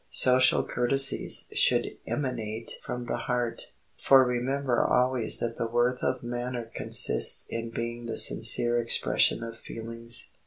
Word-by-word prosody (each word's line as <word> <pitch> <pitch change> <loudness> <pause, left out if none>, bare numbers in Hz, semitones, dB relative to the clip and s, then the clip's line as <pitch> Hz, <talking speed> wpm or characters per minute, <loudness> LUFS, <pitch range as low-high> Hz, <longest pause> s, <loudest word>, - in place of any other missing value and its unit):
Social 130 0 +3
courtesies 135 +3 0
should - - 0
emanate 115 -5 -5
from 125 0 -7
the 120 - -4
heart, 120 -1 -4 0.3
for 135 -1 +6
remember 125 +1 -1
always 125 -2 0
that 115 -1 -5
the 115 - -2
worth 120 +2 -1
of 130 - -3
manner 120 -1 -6
consists - - +3
in 115 0 -5
being 115 +1 -6
the 115 - -4
sincere 120 +1 +5
expression 115 0 0
of 115 0 -9
feelings. 115 +1 -2
120 Hz, 130 wpm, -26 LUFS, 115-125 Hz, 0.3 s, for